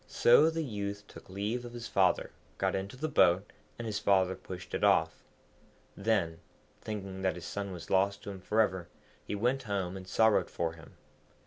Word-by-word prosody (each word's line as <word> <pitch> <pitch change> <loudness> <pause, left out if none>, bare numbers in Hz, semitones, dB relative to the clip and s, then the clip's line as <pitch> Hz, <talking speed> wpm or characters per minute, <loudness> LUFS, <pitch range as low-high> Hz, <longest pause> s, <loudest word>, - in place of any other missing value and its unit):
So 135 +7 +5
the 165 0 -2
youth 100 -5 -4
took - - -14
leave 105 +6 -2
of 120 0 -9
his 120 -1 -6
father, - - +2 0.3
got - - 0
into 100 +5 -4
the 155 +4 -2
boat, 95 - +3 0.3
and 120 - -5
his 105 -2 -2
father 95 -2 +3
pushed 90 -1 -9
it - - -2
off. 80 0 +3 0.7
Then, 100 -6 0 0.4
thinking 100 -3 -5
that 95 -1 +1
his 90 -1 -8
son 100 -1 -4
was 85 -2 -8
lost 95 +1 +2
to 100 - -5
him 95 -1 -9
for 110 +4 +2
ever, 95 -5 -1 0.4
he - - -4
went 125 +6 +1
home 100 -5 -2
and 95 -1 -8
sorrowed 110 +1 +3
for 85 -1 -2
him. 80 -2 -15
100 Hz, 190 wpm, -31 LUFS, 95-110 Hz, 0.7 s, So